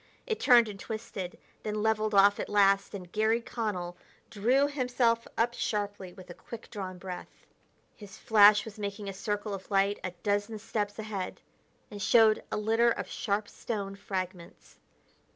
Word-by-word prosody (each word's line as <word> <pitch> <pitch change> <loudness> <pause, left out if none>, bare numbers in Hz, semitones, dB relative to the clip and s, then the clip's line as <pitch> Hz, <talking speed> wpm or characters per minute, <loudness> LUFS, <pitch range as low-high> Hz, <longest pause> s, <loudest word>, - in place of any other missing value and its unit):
It 445 - -2
turned 240 -3 +6
and 200 -2 -8
twisted, 205 -5 -6 0.2
then 210 0 -3
leveled 215 -1 +1
off 200 +1 +6
at - - -3
last, 200 0 +3
and 180 -3 -9
Garry 220 +2 +2
Connell 210 -7 -4 0.4
drew 245 +7 +3
himself 250 -4 +1
up 235 +1 +2
sharply 205 -5 -3
with 185 0 -13
a - - -7
quick 230 +5 -11
drawn 190 -4 -5
breath. 180 -1 -9 0.5
His 205 -4 -12
flash 210 -1 +6
was 220 -1 -10
making 200 0 -4
a - - -5
circle 205 +1 -3
of 190 -1 -7
light 200 0 +2
a 185 - -2
dozen 205 +2 0
steps 210 -1 -3
ahead, 210 -4 -5 0.5
and 205 -1 -7
showed 220 +1 +5
a - - -1
litter 225 +3 +3
of - - -2
sharp 205 -1 -2
stone 200 -4 -5
fragments. 185 -3 -6
205 Hz, 160 wpm, -29 LUFS, 195-220 Hz, 0.5 s, turned